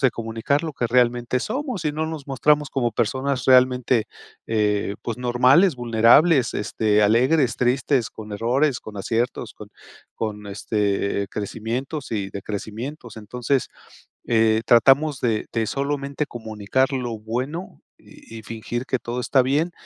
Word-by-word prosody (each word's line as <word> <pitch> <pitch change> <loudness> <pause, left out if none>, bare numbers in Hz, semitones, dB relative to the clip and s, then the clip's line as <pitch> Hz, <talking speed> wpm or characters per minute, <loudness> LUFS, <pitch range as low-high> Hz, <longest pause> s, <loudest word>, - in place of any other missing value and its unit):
de 130 -2 +4
comunicar 115 +6 -2
lo 160 - -4
que 120 -3 -2
realmente 120 0 +2
somos, 245 - -4
y 150 - 0
no 155 +1 -2
nos 160 -3 -6
mostramos 145 +2 +2
como 120 -4 -1
personas 130 +3 -1
realmente, 125 -2 +4 0.4
eh, 105 -2 0
pues, 115 +1 -4
normales, 130 +7 +4
vulnerables, 120 +4 +4
este, 105 0 +1
alegres, 125 +5 +3
tristes, 125 0 +1
con 105 -1 -10
errores, 125 +6 +1
con 105 -1 -10
aciertos, 115 +2 -2
con 105 - -11 0.5
con, 105 -2 -4
este, 100 -1 -1
crecimientos 120 +8 -4
y 100 -3 -3
decrecimientos. 110 +6 -6
Entonces, 125 +4 -2 0.6
eh, 110 -1 +3
tratamos 135 +5 +4
de 110 -3 0
de 115 -1 0
solamente, 140 +2 -2
comunicar 110 +3 -2
lo 120 -4 -3
bueno 130 - -5 0.2
y 115 - -13
y 110 - -10
fingir 115 +3 -5
que 130 - 0
todo 120 +2 -4
está 130 +1 +3
bien. 145 +7 +1
120 Hz, 140 wpm, -23 LUFS, 110-135 Hz, 0.6 s, de